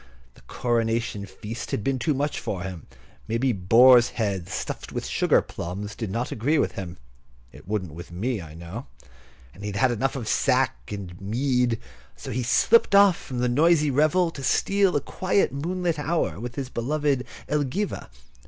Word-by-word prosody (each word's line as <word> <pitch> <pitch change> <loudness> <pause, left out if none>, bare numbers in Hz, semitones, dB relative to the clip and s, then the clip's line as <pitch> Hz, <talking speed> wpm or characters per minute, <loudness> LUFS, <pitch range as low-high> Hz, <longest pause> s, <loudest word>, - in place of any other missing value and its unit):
The - - -20
coronation 115 -3 -1
feast 110 +4 -7
had 105 - -2
been 135 +1 0
too 140 +4 0
much 145 +2 -1
for 90 -3 -4
him. 95 -4 -7 0.4
Maybe 115 +4 +1
boar's 120 +6 +6
head 100 -6 -1
stuffed - - -5
with - - -4
sugar - - +2
plums 100 +5 -6
did 110 -4 -4
not 115 +5 -2
agree 140 +8 +1
with - - +1
him 90 -2 -7 0.5
(it - - -15
wouldn't 95 -6 -3
with 85 +1 -10
me, 105 +5 -2
I 80 -2 -11
know), 85 +9 -8 0.7
and 95 - -14
he - - -3
had 100 - -4
had 125 +5 +3
enough 130 +4 -1
of 120 -5 -5
sack 60 -10 +1
and 95 -3 -7
mead; 125 +2 +1 0.4
so - - -8
he 125 - -1
slipped 200 - +4 0.2
from 130 -5 -8
the 125 +1 +1
noisy 150 +3 +3
revel 155 +5 +3
to 140 - -8
steal 195 +7 +2
a 145 - +2
quiet 185 +7 0
moonlight 170 +3 -2
hour 145 - -1
with 120 +1 -6
his 135 -2 -4
beloved 140 +2 0 0.2
Elgiva. 150 +7 -2
120 Hz, 170 wpm, -25 LUFS, 100-145 Hz, 0.7 s, boar's